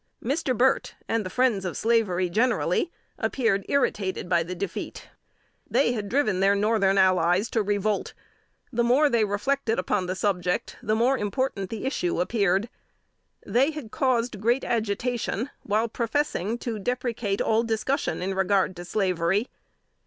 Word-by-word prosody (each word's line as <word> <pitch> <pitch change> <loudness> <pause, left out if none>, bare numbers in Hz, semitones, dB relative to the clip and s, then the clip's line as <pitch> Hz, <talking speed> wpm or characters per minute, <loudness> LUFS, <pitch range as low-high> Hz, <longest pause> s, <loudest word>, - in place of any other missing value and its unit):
Mr. 265 -1 -1
Burt, 260 +2 +2
and 225 -1 0
the 185 - -5
friends 240 -2 +1
of 180 -3 -4
slavery 215 -6 +2
generally, 225 - +1 0.3
appeared 225 -7 +1
irritated 200 -10 0
by 175 -1 +3
defeat. 180 +3 -5 0.6
They 270 - +3
had 210 -4 -3
driven 220 -8 +1
their 195 +1 +4
Northern 200 -2 +2
allies 185 +2 +3
to 225 - +2
revolt. 205 0 -1 0.6
The 235 +1 +2
more 275 +5 +4
they 230 -2 +3
reflected 225 +4 0
upon 190 -3 0
the 185 - -2
subject, 180 -3 -1
the 215 - 0
more 250 +4 +2
important 205 -2 -2
the 225 +1 -5
issue 180 -11 -1
appeared. 200 +1 +1 0.8
They 265 +5 +3
had 300 -8 -7
caused 240 -5 0
great 240 +4 +2
agitation, 235 +2 -1
while 215 +2 0
professing 235 -3 -1
to 235 -3 -4
deprecate 235 -3 -2
all 220 0 +2
discussion 230 0 -1
in 195 +1 -1
regard 190 0 +1
to 175 - -7
slavery. 185 +2 0
215 Hz, 145 wpm, -26 LUFS, 190-240 Hz, 0.8 s, their